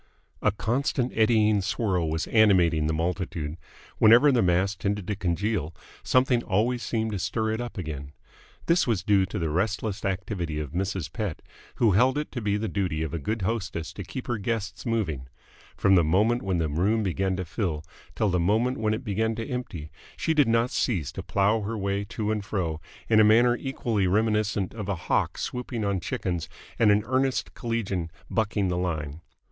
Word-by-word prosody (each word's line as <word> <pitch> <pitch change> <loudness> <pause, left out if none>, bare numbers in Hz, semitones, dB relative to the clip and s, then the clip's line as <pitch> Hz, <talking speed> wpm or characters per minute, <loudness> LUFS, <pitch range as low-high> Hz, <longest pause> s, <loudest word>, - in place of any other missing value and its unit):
A 105 - +3
constant 125 +4 -1
eddying 110 -2 +4
swirl 90 -4 0
was 80 +2 -1
animating 90 -8 +4
the - - +1
multitude. 80 -2 -2 0.4
Whenever 120 +7 +7
the 125 -3 +3
mass 90 +2 +2
tended 105 -2 -2
to 105 - -2
congeal, 90 -3 -1 0.3
something 125 -1 +3
always 120 +5 0
seemed 110 -2 -1
to 100 - -3
stir 110 +3 -1
it 110 +2 -2
up 120 -2 -6
again. 75 -6 -5 0.5
This 170 -2 +3
was 115 -6 0
due 100 -2 +3
to - - -5
the 80 -2 -1
restless 100 +3 -1
activity 90 -4 -2
of 75 -3 -5
Mrs. 95 -1 -3
Pett, 105 -8 -4 0.3
who 115 -3 +3
held 125 +8 +3
it 150 - -3
to 120 - -4
be 105 -1 +1
the 110 +1 -2
duty 90 -7 -1
of 80 - -4
a 85 - -2
good 105 +7 -2
hostess 95 -6 -3
to 100 - -6
keep 125 +7 -7
her 120 -3 -2
guests 105 +1 -3
moving. 80 - -1 0.5
From 95 - +4
the 90 -3 +6
moment 105 +10 +2
when 95 -2 -1
the 80 -2 0
room 95 +9 +1
began 95 0 0
to 90 0 -3
fill 80 -4 -3 0.3
till 110 - +1
the 90 -1 +1
moment 110 +8 +1
when 110 0 +1
it 115 - -7
began 110 +1 0
to 115 +3 -4
empty 120 - -5 0.3
she 160 - +1
did 145 -5 +4
not 115 +2 +2
cease 90 - 0
to - - -6
plough 105 +3 +1
her 110 +2 -3
way 100 0 -1
to 105 +1 -3
and 105 -2 -1
fro, 85 -6 -2 0.3
in 110 -1 +5
a - - +8
manner 120 +3 +5
equally 120 -7 -1
reminiscent 105 -1 +1
of 105 -3 -5
a 100 - 0
hawk 85 - -1
swooping 120 -3 -3
on 100 -1 0
chickens 85 -1 -3 0.3
and 110 - +5
an 105 0 +4
earnest 130 +1 0
collegian 100 -8 -2 0.2
bucking 105 -3 0
the 90 -1 -1
line. 80 -4 -3
105 Hz, 190 wpm, -26 LUFS, 90-115 Hz, 0.5 s, a